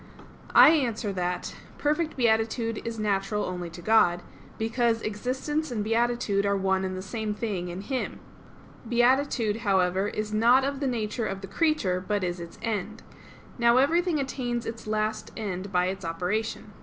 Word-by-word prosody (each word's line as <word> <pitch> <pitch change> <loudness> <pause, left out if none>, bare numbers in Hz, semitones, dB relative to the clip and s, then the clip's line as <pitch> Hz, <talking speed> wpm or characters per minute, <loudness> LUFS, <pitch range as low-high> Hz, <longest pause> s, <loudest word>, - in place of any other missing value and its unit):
I - - +10
answer 235 -9 +1
that, 180 -1 -3 0.2
Perfect 305 +2 0
beatitude 225 -1 +1
is 230 -1 -4
natural 210 0 0
only 180 -1 -4
to 170 +1 -11
God, 175 -5 +4 0.3
because 230 0 0
existence 260 +8 -2
and 220 -4 -2
beatitude 225 -2 +1
are 200 0 +1
one 190 0 +1
and 185 0 -3
the 185 - -5
same 210 +1 -3
thing 205 -5 -3
in 175 +2 -5
Him. 260 +4 -3 0.7
Beatitude, 240 -2 +2
however, 190 -3 +1
is 215 0 -4
not 240 +5 +5
of 275 0 -2
the 280 - -1
nature 225 -2 -2
of 195 0 -4
the 195 - -7
creature, 195 - +1
but 205 -2 0
is 175 0 -2
its 170 -1 -9
end. 215 -1 -3 0.6
Now 235 +1 +5
everything 330 +4 +3
attains 245 -3 -2
its 225 -1 -6
last 215 0 -1
end 195 -3 -4
by 180 -1 +2
its 190 +1 -3
operation. 185 +6 -3
215 Hz, 160 wpm, -27 LUFS, 195-240 Hz, 0.7 s, I